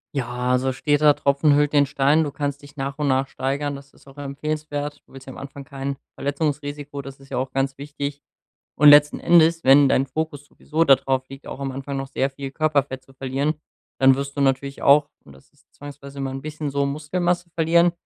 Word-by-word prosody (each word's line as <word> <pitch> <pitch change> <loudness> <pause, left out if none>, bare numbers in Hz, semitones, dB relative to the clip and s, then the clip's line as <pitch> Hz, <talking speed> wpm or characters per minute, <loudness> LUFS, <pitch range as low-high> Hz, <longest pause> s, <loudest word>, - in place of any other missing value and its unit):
Ja, 125 -1 -2
also 130 +1 +1
steter 145 +2 +3
Tropfen 140 +1 +2
höhlt 145 0 +2
den 145 -1 +5
Stein. 140 +3 +2
Du 145 - -4
kannst 145 0 -4
dich 145 +1 -16
nach 135 0 -4
und 150 -1 -1
nach 135 +1 +1
steigern, 140 +2 -3
das 140 0 -13
ist - - -23
auch 135 +1 -16
empfehlenswert. 145 +1 -4
Du - - -26
willst 135 0 -12
ja 130 - -8
am - - -12
Anfang 140 0 -9
kein 140 -1 -5 0.2
Verletzungsrisiko, 145 0 -3
das 135 0 -11
ist 135 0 -17
ja - - -3
auch 130 +1 -2
ganz 135 0 -1
wichtig. 145 0 -6 0.6
Und 150 - +6
letzten 145 0 +7
Endes, 165 -1 +4
wenn 135 +1 +7
dein 135 +1 +2
Fokus 145 +1 -4
sowieso 155 +2 -2
dadrauf 135 -2 +2
liegt, 135 +1 -12
auch - - -7
am 135 -1 -3
Anfang 135 +1 -5
noch 135 0 -4
sehr 135 0 -1
viel 135 0 -7
Körperfett 140 -3 0
zu 135 - -20
verlieren, 135 +3 -1 0.5
dann 135 0 +7
wirst 140 +1 -5
du - - -2
natürlich 135 0 0
auch, 145 +1 +5 0.2
und 70 - -15
das 65 0 -20
ist - - -32
zwangsweise 140 -1 -11
immer 135 -1 -3
’n 135 0 -6
bisschen 155 -1 -5
so, 140 0 0
Muskelmasse 175 +5 -2
verlieren. 170 +1 +3
140 Hz, 215 wpm, -22 LUFS, 135-150 Hz, 0.6 s, letzten